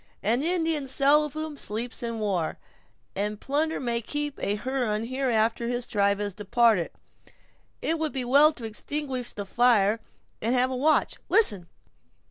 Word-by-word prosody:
An 230 +6 +1
Indian 325 -3 0
seldom 300 +3 +1
sleeps 230 +2 -4
in 230 -1 -3
war, 195 -7 -1 0.6
and 210 +1 -2
plunder 305 +6 -1
may 235 -2 -1
keep 295 +4 -4
a 205 - -1
Huron 230 -2 -1
here 260 +2 -1
after 225 +1 +1
his 245 0 -2
tribe 200 -2 +1
has 205 -1 -3
departed. 210 -2 +2 0.9
It 325 0 0
would 315 -2 -1
be 260 -2 -3
well 285 +5 +6
to 235 - -7
extinguish 255 +3 -3
the 205 - -6
fire, 225 -1 +3 0.4
and 230 +4 +1
have 255 +1 +2
a - - -2
watch—listen! 260 - +2
245 Hz, 145 wpm, -26 LUFS, 215-285 Hz, 0.9 s, well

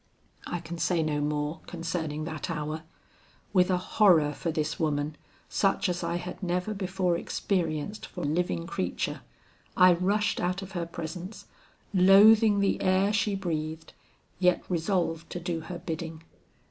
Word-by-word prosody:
"I 175 - -3
can 170 0 -7
say 170 -1 +1
no 150 -1 -1
more 150 +1 -1
concerning 165 -3 -3
that 155 -2 -5
hour. 155 -1 -3 0.7
With 180 -1 +4
a 185 - +3
horror 180 -5 +4
for 165 - -3
this 155 -1 -2
woman 150 -1 0 0.3
such 195 0 +1
as 175 0 -2
I 170 0 -1
had 180 +2 -5
never 180 +3 -1
before 185 -2 0
experienced 170 +1 -2
for - - -7
living 150 - 0
creature, - - -3 0.6
I 185 0 +8
rushed 200 +4 +1
out 180 +2 -1
of 195 - -9
her 175 -3 -3
presence, 170 +4 -7 0.5
loathing 205 +3 +7
the 200 - +1
air 190 +2 +3
she 210 -1 +1
breathed, 160 -4 -4 0.5
yet 180 -1 +3
resolved 170 -2 -1
to 175 - -3
do 170 -1 -3
her 170 +2 -7
bidding. 165 -1 -6
175 Hz, 145 wpm, -28 LUFS, 160-185 Hz, 0.7 s, I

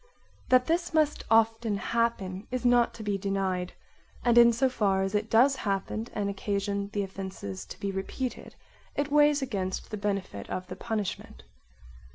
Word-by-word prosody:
That 255 0 +5
this 340 +1 0
must 305 -1 +2
often 225 -1 +3
happen 200 -3 -1
is 255 0 -3
not 245 -1 +4
to 225 - -8
be 205 -2 -1
denied, 190 -2 -1 0.5
and 240 -1 +4
in 235 0 +8
so 235 +4 +2
far 200 -6 +1
as 195 +1 -2
it 210 +1 0
does 265 +5 +5
happen 205 +1 -2
and 205 -1 -1
occasions 200 0 -2
the 205 - 0
offence 190 - -6
to - - -10
be 200 - -2
repeated 215 +6 -5 0.4
it 285 0 -1
weighs 295 -1 +4
against 190 -7 -3
the 215 - -3
benefit 195 - -3
of 185 0 -3
the 185 - -5
punishment. 200 - -4
210 Hz, 165 wpm, -28 LUFS, 195-240 Hz, 0.5 s, in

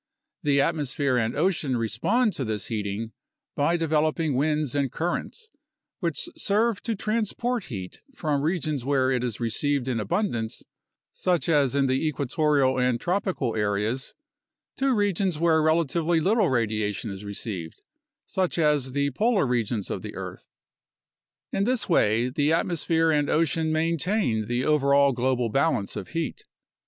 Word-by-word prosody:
The 140 -1 +2
atmosphere 145 -3 0
and 115 +1 -1
ocean 155 -5 +1
re 115 -1 0
spond 215 - +1
to 135 - -3
this 110 -3 -4
heating 110 0 -3 0.4
by 165 +4 +2
developing 155 -1 +1
winds 150 0 0
and 140 -3 0
currents, 175 - -3 0.5
which 170 -7 -2
serve 215 +1 +1
to 225 -1 -2
transport 230 +2 -1
heat 95 -8 -7
from 150 -3 -1
regions 155 -4 -1
where 135 -1 +2
it 125 -2 0
is 120 -4 -3
received 130 +3 -1
in 125 -3 0
abundance, 120 - -2 0.5
such 175 -6 0
as 145 -5 +3
in 140 -1 +3
the 130 +2 +1
equatorial 145 -2 +1
and 125 -1 +1
tropical 185 - -1
areas, 105 +5 -1 0.6
to 270 0 +2
regions 195 -4 +1
where 160 -1 +3
relatively 165 +1 +2
little 210 +5 +2
radiation 110 -3 -1
is 95 +1 -8
received, 100 -5 -6 0.4
such 185 -2 -1
as 150 -5 +1
the 140 0 +1
polar 210 - +2
regions 115 -4 -1
of - - -3
the - - -8
earth. - - -7 1.1
In 195 - +1
this 250 +2 0
way, 115 - +3
the 145 +3 +1
atmosphere 165 -1 +1
and 145 -2 +1
ocean 160 0 +1
maintain 165 - 0
the 120 +2 -1
overall 140 -2 +4
global 125 -1 0
balance 135 -5 0
of - - -5
heat. 165 -1 -4
145 Hz, 145 wpm, -26 LUFS, 125-170 Hz, 1.1 s, overall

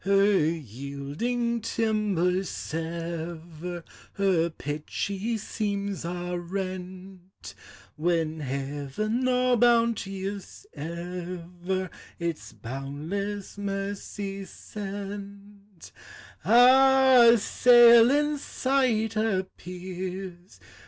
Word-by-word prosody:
Her 195 -2 +4
yielding 150 - -3
timbers 200 -5 0
sever, 165 +1 -5 0.3
Her 185 -4 +2
pitchy 190 +9 -3
seams 200 -2 -3
are 175 +1 -3
rent, 185 0 -7 0.4
When 160 -1 0
Heaven, 145 - -2
all 250 -1 +3
bounteous 205 -5 0
ever, 175 +3 -5 0.3
Its 170 -2 -4
boundless 160 - -5
mercy 195 0 -4
sent, 200 -1 -9 0.3
— - - -20
A 255 +1 +7
sail 235 +1 +7
in 295 +1 +1
sight 255 -6 0
appears! 185 -2 -4
195 Hz, 70 wpm, -27 LUFS, 170-215 Hz, 0.4 s, A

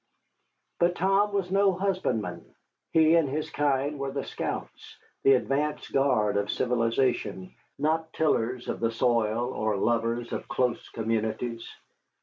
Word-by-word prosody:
But 175 +1 +3
Tom 195 +3 +2
was 195 -3 -1
no 195 0 +4
husbandman. 185 - -1 0.5
He 160 -1 +5
and 165 -4 +4
his 155 +3 -3
kind 145 0 0
were 140 0 -2
the 140 0 -3
scouts, - - -6 0.2
the 135 - +6
advance 145 +4 -1
guard 110 -7 +2
of 100 0 -1
civilization, 115 -5 0 0.2
not 160 +2 0
tillers 125 -6 0
of - - -3
the 115 - +1
soil 120 0 +1
or 110 -1 -1
lovers 115 +2 0
of - - -4
close 125 -2 -1
communities. 115 +1 -2
130 Hz, 135 wpm, -27 LUFS, 115-160 Hz, 0.5 s, the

